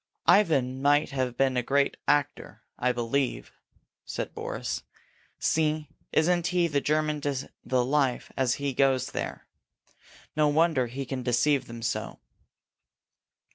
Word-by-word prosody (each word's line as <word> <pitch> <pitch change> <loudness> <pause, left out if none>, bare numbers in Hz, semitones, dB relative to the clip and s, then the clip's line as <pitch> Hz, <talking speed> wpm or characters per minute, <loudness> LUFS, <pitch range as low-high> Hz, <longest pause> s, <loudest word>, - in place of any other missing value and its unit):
"Ivan 135 -10 +3
might 145 +1 +3
have 130 -3 -2
been 135 -1 +2
a 125 - +2
great 140 +3 +1
actor, 145 0 0 0.2
I 125 0 +2
believe," 120 - -1 0.5
said - - -5
Boris. - - -4 0.6
"See, 155 -1 0 0.2
isn't 175 +2 +2
he 180 -1 +2
the 145 -3 0
German 150 0 0
to 140 -2 -3
the 125 -1 +1
life 135 -2 0
as 130 -2 +1
he 140 -1 -2
goes, 130 -1 +2
there? - - -5 0.9
No 150 0 +3
wonder 150 -4 +2
he 135 +3 -5
can 130 0 -4
deceive 125 +3 +2
them 115 0 -8
so!" 120 - -3
140 Hz, 135 wpm, -27 LUFS, 125-150 Hz, 0.9 s, Ivan